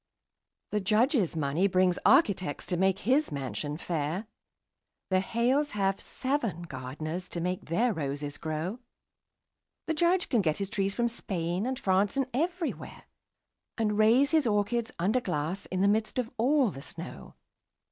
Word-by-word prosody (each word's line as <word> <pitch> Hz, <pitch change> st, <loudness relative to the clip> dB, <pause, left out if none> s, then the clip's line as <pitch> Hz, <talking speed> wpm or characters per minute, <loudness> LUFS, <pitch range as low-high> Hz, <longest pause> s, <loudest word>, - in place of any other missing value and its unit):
The 210 Hz, -, +1 dB
Judge's 215 Hz, -, +2 dB
money 155 Hz, +5 st, +1 dB
brings 185 Hz, -1 st, +2 dB
architects 200 Hz, -, +3 dB
to 180 Hz, -, 0 dB
make 190 Hz, +1 st, +2 dB
his 265 Hz, +9 st, +2 dB
mansion 145 Hz, +2 st, -4 dB
fair; 170 Hz, +3 st, -2 dB, 0.9 s
The 185 Hz, -, +4 dB
Hales 245 Hz, +9 st, +1 dB
have 195 Hz, -1 st, +1 dB
seven 240 Hz, -, -2 dB
gardeners 155 Hz, +5 st, -5 dB
to 170 Hz, -, -3 dB
make 180 Hz, +2 st, -2 dB
their 225 Hz, +9 st, +1 dB
roses 145 Hz, -2 st, -4 dB
grow; 160 Hz, +7 st, -3 dB, 1.1 s
The 320 Hz, -, 0 dB
Judge 345 Hz, +3 st, +2 dB
can 235 Hz, -, +2 dB
get 155 Hz, -4 st, 0 dB
his 195 Hz, -1 st, -3 dB
trees 195 Hz, -1 st, 0 dB
from 240 Hz, -1 st, +2 dB
Spain 185 Hz, -3 st, -2 dB
and 260 Hz, 0 st, -2 dB
France 195 Hz, +4 st, +1 dB
and 270 Hz, -, +2 dB
everywhere, 340 Hz, +5 st, -3 dB, 0.7 s
And 215 Hz, -2 st, +1 dB
raise 240 Hz, +6 st, +5 dB
his 315 Hz, -6 st, +3 dB
orchids 220 Hz, +3 st, 0 dB
under 205 Hz, +9 st, +1 dB
glass 175 Hz, 0 st, -3 dB
in 185 Hz, 0 st, -2 dB
the 200 Hz, -, +4 dB
midst 215 Hz, +3 st, +1 dB
of 245 Hz, -2 st, -1 dB
all 255 Hz, 0 st, +3 dB
the 135 Hz, -, -9 dB
snow. -, -, -9 dB
200 Hz, 150 wpm, -29 LUFS, 170-245 Hz, 1.1 s, raise